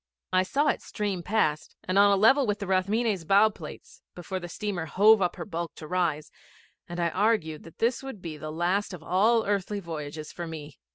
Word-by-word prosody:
I 185 - +5
saw 285 +10 +1
it - - 0
stream 205 -4 -3
past 165 -6 0
and 185 +2 +1
on 200 0 +6
a - - +5
level 250 +7 +5
with 205 0 0
the 200 - -5
Rathmines' 195 +1 +1
bow 200 +6 +5
plates 165 -7 -11
before 180 +2 -5
the 175 -1 -8
steamer 185 -3 -3
hove 210 +6 +5
up 180 - +1
her 170 - -6
bulk 165 -1 -5
to 155 - -9
rise, 165 -3 -1 0.6
and 175 0 -5
I 170 -1 +2
argued 185 -5 0
that 165 - -14
this 235 +2 +1
would 270 -6 -8
be 165 -3 -6
the 155 +1 -7
last 180 +5 0
of 165 - -13
all 215 +7 +3
earthly 205 0 -1
voyages 155 -3 -6
for 175 -1 -6
me. 155 -3 -9
185 Hz, 210 wpm, -27 LUFS, 165-210 Hz, 0.6 s, on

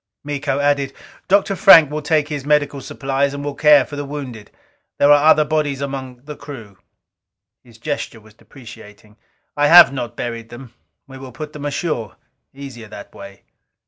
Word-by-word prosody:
Miko 145 -1 -3
added, 140 -1 0 0.3
"Dr. 195 0 +2
Frank 165 -7 +7
will 150 0 -4
take 150 0 0
his 150 -3 -5
medical 145 -1 0
supplies 140 +1 -3
and 145 0 -7
will 145 - -4
care 145 -2 +4
for 145 - -10
the 145 - -5
wounded. 135 -7 -8 0.5
There 145 - +4
are 145 +1 +5
other 155 -1 +4
bodies 150 -3 -2
among 130 -3 -7
the 150 +1 -9
crew." 115 -10 -12 0.8
His 115 -3 -19
gesture 130 -2 -5
was 110 0 -20
deprecating. 105 -4 -16 0.4
"I 145 0 +2
have 165 -3 +8
not 120 -3 -6
buried 115 -1 -6
them. 120 0 -12 0.3
We 135 0 -13
will 130 -1 -10
put 150 +4 -9
them 145 -1 -8
ashore; 145 - -4 0.4
easier 135 -5 -11
that 105 -1 -12
way." 100 0 -13
140 Hz, 170 wpm, -18 LUFS, 120-150 Hz, 0.8 s, have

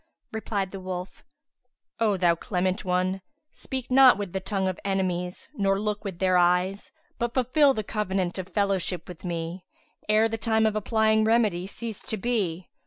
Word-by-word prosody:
Replied 205 -3 -3
the 195 - -6
wolf, 185 0 -6 0.8
"O 215 -4 +2
thou 175 -2 +4
clement 185 +3 -1
one, 185 +1 0 0.3
speak 260 -2 -5
not 260 -1 +7
with 200 -4 -5
the 190 - -1
tongue 190 0 -1
of 185 -2 -3
enemies 185 -2 -2
nor 195 -1 +1
look 210 0 -2
with 195 -4 -5
their 185 0 +3
eyes; 180 +3 +1 0.3
but 235 0 -2
fulfil 270 +2 +4
the 215 - -2
covenant 190 -3 -2
of 185 0 -6
fellowship 195 -3 -1
with 180 -3 -10
me, 170 0 -4 0.5
ere 215 +1 +5
the 225 0 -4
time 220 0 +2
of 215 -1 +1
applying 220 0 +2
remedy 215 -5 +2
cease 225 +1 -6
to 220 - -3
be. 190 -6 -1
195 Hz, 170 wpm, -26 LUFS, 180-220 Hz, 0.8 s, not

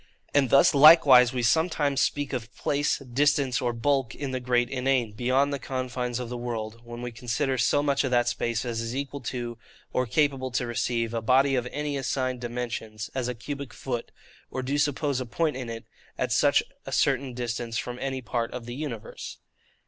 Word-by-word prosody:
And 140 -3 +3
thus 135 - +6
likewise 140 -4 +8
we 125 -2 -2
sometimes 145 0 +2
speak 145 -1 0
of 120 -2 -4
place, 145 +1 0
distance, 135 0 +1
or 120 -1 +1
bulk, 130 +1 0
in 140 -2 -4
the 130 - -2
great 125 -1 +1
INANE, 130 -3 +1
beyond 130 +6 +1
the 140 - -2
confines 125 -2 -3
of 125 - -4
the 125 +1 -5
world, 115 -2 -5
when 120 0 -8
we 120 - -4
consider 125 +3 -1
so 145 +5 +3
much 140 -1 +2
of 130 - 0
that 120 -1 +2
space 115 0 -1
as 115 -2 -2
is 115 +2 -4
equal 140 0 -4
to, 120 -1 -5 0.3
or 125 -1 +1
capable 135 0 +1
to 125 0 -1
receive, 120 -1 -1
a 115 - -1
body 135 +4 +4
of 125 -2 0
any 150 -1 -2
assigned 130 -1 -2
dimensions, 115 -2 -5
as 130 -2 -2
a 125 - -3
cubic 140 +1 -6
foot; 120 -3 -4 0.4
or 130 - -4
do 135 +3 -1
suppose 145 -2 0
a - - -3
point 155 +5 0
in 125 -2 -5
it, 115 0 -7 0.3
at - - -1
such - - +4 0.2
a - - -5
certain 130 -3 +1
distance 115 -1 -3
from 125 0 -4
any 135 -1 -3
part 115 +1 -2
of 125 -2 -6
the 120 - -6
universe. 125 -6 -6
125 Hz, 195 wpm, -27 LUFS, 120-140 Hz, 0.4 s, likewise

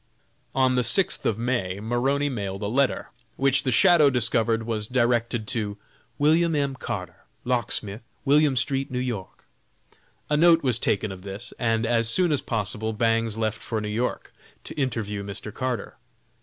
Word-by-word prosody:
On 130 -1 +3
the 125 -1 +2
sixth 150 +12 +2
of 110 - 0
May, 115 -6 -1
Maroney 130 +6 0
mailed 100 -7 -4
a - - -1
letter, 135 +5 0 0.3
which 135 0 +2
the 130 - -1
"shadow" 150 +4 +6
discovered 115 -2 +1
was 110 -2 -2
directed 120 -2 +1
to 105 -4 -2 0.4
"William 160 +3 +3
M. 140 -2 0
Carter, 95 -9 -6 0.2
Locksmith, 120 -3 -1 0.2
William 145 0 +4
st., 135 +3 0
N. 125 0 -2
Y." 95 - -6 1.0
A 150 - +1
note 165 0 +5
was 125 -3 +1
taken 105 -2 0
of 95 -1 -9
this, 100 +5 -8
and 115 -1 +1
as 115 -1 +2
soon 175 +7 +3
as 145 - +1
possible 110 0 -2
Bangs 115 0 +1
left 110 -2 -2
for 110 - -2
New 105 0 -4
York, 115 +4 -3 0.3
to - - -7
interview 110 -7 -2
Mr. 100 +1 -7
Carter. 130 0 -3
120 Hz, 160 wpm, -25 LUFS, 110-135 Hz, 1.0 s, shadow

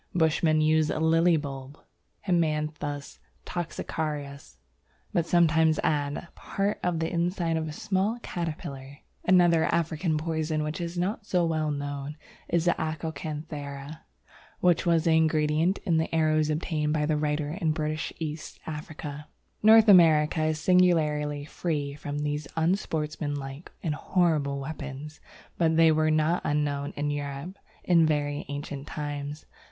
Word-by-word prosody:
Bushmen 160 -1 +3
use 155 0 +3
a - - -1
Lily 165 +1 +4
bulb, 140 -1 -6 0.5
Haemanthus 150 -4 -1 0.3
toxicarius, 150 - -4 0.6
but 170 -1 +1
sometimes 160 -2 +4
add 145 +1 -1
part 200 +1 -2
of 175 -2 0
the 160 +1 -1
inside 170 -1 0
of 160 0 -1
a - - -4
small 200 +6 -1
caterpillar. 145 -5 -5 0.3
Another 175 -3 +5
African 160 -1 0
poison 155 -1 -1
which 150 +2 -4
is 170 +1 -4
not 200 +4 -2
so 180 -4 +2
well 155 -2 0
known 145 0 -4 0.3
is 170 -1 +1
the 175 - +5
Acokanthera, 155 -2 -5 0.6
which 175 -1 +2
was 165 -2 +3
the 165 - +2
ingredient 160 +3 +2
in 170 -5 +2
the 160 - 0
arrows 155 -1 +2
obtained 155 -1 -1
by 150 -1 +1
the 155 0 +1
writer 150 0 -1
in 165 -2 0
British 155 0 -2
East 155 -1 -6
Africa. 150 -1 -7 0.3
North 220 +1 +7
America 160 -4 +6
is 155 0 0
singularly 150 -5 +2
free 150 -3 -3
from 145 0 -5
these 150 0 -2
unsportsmanlike 150 -4 -2
and 160 -4 0
horrible 150 -4 +1
weapons, 145 +1 -7 0.4
but 160 -1 +3
they 165 -1 +6
were 155 0 +2
not 155 +3 +2
unknown 145 -1 -1
in 145 0 -1
Europe 145 +5 -5 0.3
in 170 -3 +4
very 145 -1 -1
ancient 145 -1 -6
times. 145 0 -5
155 Hz, 135 wpm, -27 LUFS, 145-165 Hz, 0.6 s, North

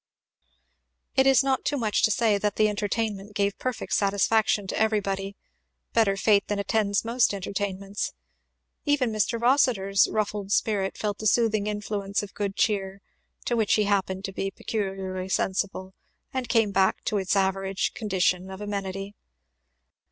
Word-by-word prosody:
It 265 0 +4
is 270 -1 +5
not 270 -1 0
too 290 - 0
much 215 -5 0
to - - +4
say 215 -1 +2
that 205 0 -1
the 215 - +4
entertainment 210 -1 -2
gave 200 0 0
perfect 255 -2 -3
satisfaction 205 0 +2
to - - -3
everybody 200 -2 0 0.6
better 205 -4 +3
fate 200 0 +3
than 205 - -1
attends 200 +1 0
most 235 -2 +2
entertainments. 195 +1 -3 0.7
Even 280 -5 +1
Mr. 215 +2 0
Rossitur's 235 -6 +3
ruffled 210 -2 -2
spirit 205 -2 0
felt 205 -1 -2
the 215 - 0
soothing 215 -2 +2
influence 205 -1 -2
of 205 - -9
good 200 -1 -3
cheer, 195 -2 0 0.5
to 240 - 0
which 220 -3 +2
he 215 - +2
happened 195 -1 0
to 195 - -4
be 195 +1 -2
peculiarly 190 -2 -4
sensible, 190 0 -1 0.4
and 255 -3 -3
came 225 -4 +3
back 190 -1 +2
to 210 - 0
its 195 +1 0
average 195 0 0
condition 190 -3 0
of 190 0 -8
amenity. 200 -1 -4
205 Hz, 150 wpm, -26 LUFS, 195-220 Hz, 0.7 s, is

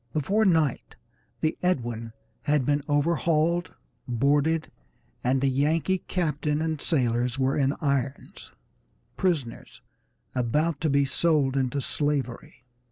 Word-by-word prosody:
Before 200 +9 +1
night 160 - +1 0.5
the 155 0 0
Edwin 120 -10 -1 0.3
had 150 -3 +1
been 145 +1 +1
overhauled, 165 +2 +1 0.3
boarded, 145 +6 +1 0.5
and 130 +1 +1
the 135 - +2
Yankee 155 +7 +1
captain 150 -4 -1
and 160 -2 -2
sailors 125 -3 +1
were 135 0 +1
in 140 0 +1
irons, 140 -2 -2 0.6
prisoners 155 -11 -2 0.5
about 145 +6 0
to 160 - +1
be 140 0 +3
sold 140 -1 +1
into 135 +1 0
slavery. 135 -4 -2
145 Hz, 110 wpm, -26 LUFS, 130-160 Hz, 0.6 s, be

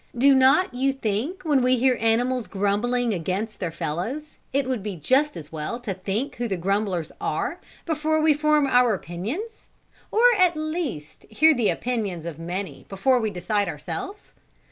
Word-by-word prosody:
Do 275 +3 +6
not 265 +5 +4
you 270 +2 +1
think 270 - -3
when 295 -5 +3
we 255 +1 +3
hear 255 +1 +3
animals 240 +2 +1
grumbling 220 +4 0
against 190 +5 -3
their 180 - -2
fellows, 205 - -4
it 275 -1 0
would 255 -5 -1
be 205 -1 -4
just 265 - +1
as 150 -3 -9
well 160 +10 -4
to 230 -5 -4
think 205 +9 -3
who 240 0 -1
the 195 -4 -2
grumblers 190 -2 -1
are, - - -2 0.3
before 315 -1 0
we 310 0 +4
form 300 0 +3
our 245 -4 +4
opinions? 235 - -6 0.4
or, 445 - +1 0.2
at 360 -2 +4
least, 310 - -4
hear 315 +8 +5
the 240 -6 +1
opinions 210 -9 -2
of 165 -2 -6
many 180 +4 -5
before 250 +7 +2
we 220 -2 0
decide 205 +2 -1
ourselves? 385 - -6
245 Hz, 165 wpm, -24 LUFS, 195-280 Hz, 0.4 s, Do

